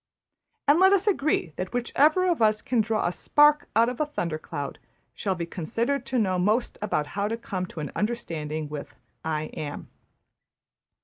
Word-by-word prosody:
And 290 +4 +6
let 380 +1 +6
us 395 0 +3
agree 305 - +1
that 185 +4 -4
whichever 300 +9 +3
of 345 -8 +1
us 215 -1 +3
can 245 -3 +2
draw 220 0 0
a 175 - +1
spark 295 +8 +4
out 230 +1 +5
of 250 0 -4
a 305 - +1
thundercloud 155 - -4 0.3
shall 195 -2 -1
be 170 -1 -3
considered 235 - -2
to 260 - -1
know 190 -5 +1
most 215 +7 +1
about 180 -8 0
how 200 0 0
to 225 +2 -2
come 185 -5 -4
to 160 - -7
an 145 - -5
understanding 160 -9 -2
with 150 -1 -7 0.3
`I 155 -1 -3
Am.' 145 -2 -6
215 Hz, 175 wpm, -26 LUFS, 170-270 Hz, 0.3 s, And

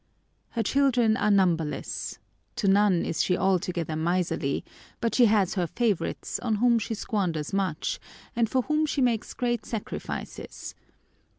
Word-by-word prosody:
Her 225 - +2
children 250 -5 +3
are 210 - +1
numberless. 175 -6 0 0.4
To 200 - -1
none 195 -3 +4
is - - 0
she 180 - +2
altogether 180 -4 0
miserly; 165 -3 0 0.3
but 230 -1 0
she 245 - +6
has 205 -4 +3
her 180 -4 0
favourites, 220 -1 -1
on 225 -3 0
whom 235 +2 +4
she 225 +1 -3
squanders 180 -8 -2
much, 190 -5 -1 0.4
and 230 -2 +2
for 255 +1 +1
whom 305 +2 +1
she 290 - -1
makes 240 -4 0
great 240 -2 -1
sacrifices. 225 -3 -6
205 Hz, 140 wpm, -27 LUFS, 180-235 Hz, 0.4 s, she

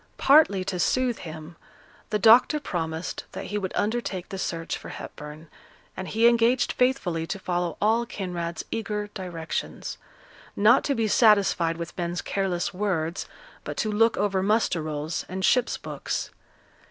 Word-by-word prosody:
Partly 275 -10 +5
to 185 -1 -3
soothe 255 +4 +1
him, 160 0 -9 0.5
the 210 - +1
doctor 235 +8 +6
promised 165 - -4
that - - -6
he 210 - -2
would 190 -2 -3
undertake 205 -4 -2
the 195 - -5
search 165 -2 -3
for - - -9
Hepburn, 150 +2 -9 0.5
and 190 - -5
he 225 +2 +4
engaged 235 +1 +3
faithfully 185 -11 0
to - - -3
follow 175 -3 -2
all 225 +3 +2
Kinraid's 175 -5 -4
eager 210 -2 -3
directions; 175 -4 -5 0.6
not 220 +5 +5
to 280 - +1
be 225 -2 +1
satisfied 200 -7 +4
with 170 0 -6
men's 175 0 -2
careless 190 -3 -1
words, 180 -3 -2 0.4
but - - -6
to 215 - 0
look 225 +2 +3
over 195 -2 +1
muster 210 -4 +1
rolls 155 +1 -3
and 185 +1 -2
ships' 250 -2 +2
books. - - -4
195 Hz, 150 wpm, -26 LUFS, 170-225 Hz, 0.6 s, doctor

